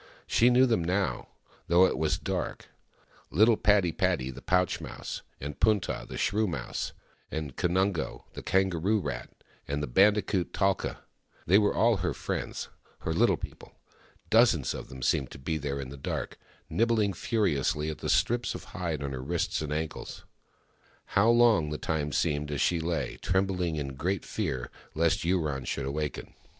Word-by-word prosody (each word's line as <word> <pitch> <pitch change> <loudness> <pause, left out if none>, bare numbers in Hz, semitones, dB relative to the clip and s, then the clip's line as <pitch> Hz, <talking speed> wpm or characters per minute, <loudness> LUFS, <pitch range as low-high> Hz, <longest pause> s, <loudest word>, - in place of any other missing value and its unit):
She 120 - +4
knew 125 +1 +6
them 115 -9 +1
now, 95 +3 -1 0.4
though 90 +2 +6
it - - +1
was 80 -1 +1
dark— - - -4 0.6
little 110 +7 +5
Padi 105 -5 +3
padi, 65 -4 0
the - - -10
pouch 90 -1 +1
mouse, - - -6 0.2
and 70 +1 -6
Punta, 105 - +1
the - - -6
shrew 110 +1 +1
mouse, 85 - -4 0.4
and 75 -4 -4
Kanungo, 90 -1 0
the - - -7
kangaroo 95 +2 +2
rat, 65 -9 -4 0.4
with 70 +1 -1
the 75 - -1
bandicoot, 100 - +3
Talka. 95 -1 0 0.4
They 95 +5 +6
were 105 -1 +2
all 115 -2 +4
her 90 0 -2
friends— - - -4 0.3
her - - -1
Little - - +3
People. - - -9 0.6
Dozens - - +4
of - - -7
them 65 -1 -8
seemed 65 +1 +1
to - - -9
be 80 +4 -2
there 70 -1 -3
in 65 -2 -5
the 70 - -9
dark, 70 - -4 0.3
nibbling 110 -3 +2
furiously 80 - 0
at 75 - -8
the - - -3
strips 120 - +2
of - - -7
hide 85 -7 -2
on 70 - -3
her 65 -1 -4
wrists 85 +5 -1
and 75 -1 -4
ankles. 80 +1 -4 0.9
How 100 +4 +5
long 115 -9 +5
the 75 - -3
time 75 +1 -2
seemed 75 +2 0
as 75 -2 -2
she 85 +5 +2
lay, 80 -5 -2
trembling, 95 -3 0
in 70 -3 -3
great 85 +7 -2
fear 65 -2 -3 0.2
lest 80 +1 +2
Yurong 80 -7 0
should 70 - -2
awaken 75 +2 -4
85 Hz, 165 wpm, -29 LUFS, 75-100 Hz, 0.9 s, knew